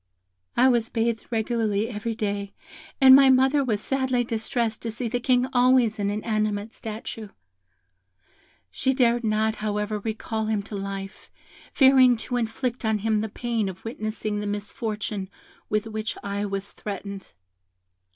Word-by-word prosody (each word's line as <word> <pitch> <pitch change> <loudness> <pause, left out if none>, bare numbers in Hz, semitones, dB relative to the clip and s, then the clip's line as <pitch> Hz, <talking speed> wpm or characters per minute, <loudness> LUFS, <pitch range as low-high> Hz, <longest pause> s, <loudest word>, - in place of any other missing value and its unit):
"I 255 - +6
was 235 -3 +2
bathed 230 -1 -1
regularly 220 -2 0
every 225 0 -4
day, 200 -2 -3 0.5
and 265 -1 +9
my 270 0 +7
mother 265 +2 +4
was 215 -5 -1
sadly 260 -1 0
distressed 225 0 -2
to 230 - -3
see 230 +2 -3
the 245 +2 -1
King 250 0 +2
always 245 -3 +4
an 200 0 0
inanimate 215 0 -1
statue. 220 0 -7 1.4
She 265 0 0
dared 240 -2 +3
not, 220 0 +1
however, 210 0 -2
recall 220 0 -3
him 215 -2 0
to 210 +1 -8
life, 195 0 -6 0.4
fearing 260 -3 +6
to 245 +2 -3
inflict 240 +2 -2
on 220 -1 +1
him 215 0 0
the 220 - -3
pain 230 -2 -2
of 190 +2 -11
witnessing 215 -2 -3
the 205 - -3
misfortune 205 -1 -4 0.4
with 215 0 0
which 220 0 -4
I 200 +1 -2
was 195 0 -3
threatened. 200 -1 -7
220 Hz, 145 wpm, -25 LUFS, 210-240 Hz, 1.4 s, and